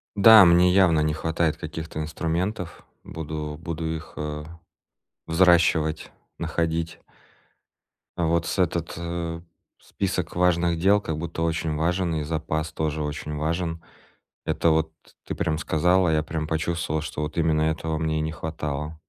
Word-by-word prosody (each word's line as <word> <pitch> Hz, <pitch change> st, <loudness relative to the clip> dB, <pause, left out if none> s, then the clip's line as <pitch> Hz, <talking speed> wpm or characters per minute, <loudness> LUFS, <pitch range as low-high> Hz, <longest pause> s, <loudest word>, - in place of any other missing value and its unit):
Да, 105 Hz, 0 st, +9 dB
мне 90 Hz, +1 st, +6 dB
явно 90 Hz, -4 st, +4 dB
не 75 Hz, 0 st, +1 dB
хватает 80 Hz, 0 st, 0 dB
каких-то 80 Hz, -1 st, -6 dB
инструментов, 85 Hz, +3 st, -3 dB, 0.2 s
буду 75 Hz, -1 st, -5 dB
буду 80 Hz, -1 st, -4 dB
их, 80 Hz, -, -9 dB
э, 75 Hz, 0 st, -4 dB, 0.8 s
взращивать, 80 Hz, -2 st, +3 dB, 0.3 s
находить. 80 Hz, 0 st, -2 dB, 1.2 s
Вот 85 Hz, 0 st, +1 dB
с -, -, -3 dB
этот 85 Hz, -2 st, 0 dB, 0.8 s
список 90 Hz, -4 st, -3 dB
важных 85 Hz, -1 st, +2 dB
дел 100 Hz, +4 st, +4 dB
как 80 Hz, -5 st, -3 dB
будто 80 Hz, +1 st, -4 dB
очень 80 Hz, -1 st, -1 dB
важен, 85 Hz, +2 st, 0 dB
и 75 Hz, -, -1 dB
запас 80 Hz, 0 st, -2 dB
тоже 80 Hz, -1 st, -2 dB
очень 75 Hz, 0 st, -4 dB
важен. 80 Hz, +2 st, -2 dB, 0.6 s
Это 85 Hz, -, +1 dB
вот 80 Hz, 0 st, +1 dB, 0.3 s
ты -, -, -4 dB
прям 80 Hz, -2 st, -1 dB
сказал, 90 Hz, +4 st, +2 dB
а 80 Hz, -, +2 dB
я 75 Hz, 0 st, +2 dB
прям 80 Hz, 0 st, -3 dB
почувствовал, 80 Hz, -1 st, -1 dB
что 75 Hz, 0 st, -5 dB
вот 75 Hz, +2 st, -4 dB
именно 80 Hz, -1 st, +2 dB
этого 80 Hz, 0 st, -1 dB
мне 80 Hz, -1 st, 0 dB
не 80 Hz, +1 st, -2 dB
хватало. 75 Hz, -1 st, -4 dB
80 Hz, 140 wpm, -25 LUFS, 80-85 Hz, 1.2 s, Да